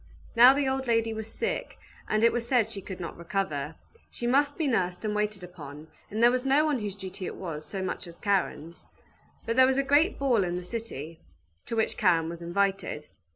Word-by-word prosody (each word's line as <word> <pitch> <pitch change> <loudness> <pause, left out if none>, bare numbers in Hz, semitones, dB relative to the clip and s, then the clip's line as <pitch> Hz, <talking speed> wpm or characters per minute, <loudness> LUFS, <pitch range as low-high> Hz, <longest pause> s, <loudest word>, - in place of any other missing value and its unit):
Now 245 +3 +9
the 285 -1 +1
old 265 0 -1
lady 230 -1 +2
was 220 0 -6
sick, - - -3 0.3
and 215 +1 +2
it 230 - +5
was 235 -1 -2
said 240 -4 +2
she 200 - -5
could 190 -1 -8
not 170 - -5
recover. 165 -5 -2 0.3
She 240 - -6
must 285 +4 +2
be 315 - 0
nursed 180 -6 0
and 210 - 0
waited 210 -2 -1
upon, 155 -3 -10 0.2
and 220 +3 -1
there 240 - +7
was 250 0 0
no 275 +3 +4
one 295 -4 +1
whose 205 -3 -4
duty 190 -1 -7
it - - -6
was 160 -5 -6
so 195 -2 -4
much 185 - -4
as 170 0 -11
Karen's. 180 -4 -2 0.6
But 230 - -1
there 260 0 +8
was 265 0 +2
a 275 - +3
great 290 +7 +3
ball 250 -7 +2
in 175 -1 -2
the 180 - -4
city, 175 - -6 0.5
to - - -3
which 220 - 0
Karen 170 -6 +3
was 170 0 -7
invited. 190 -3 -1
210 Hz, 215 wpm, -28 LUFS, 175-245 Hz, 0.6 s, Now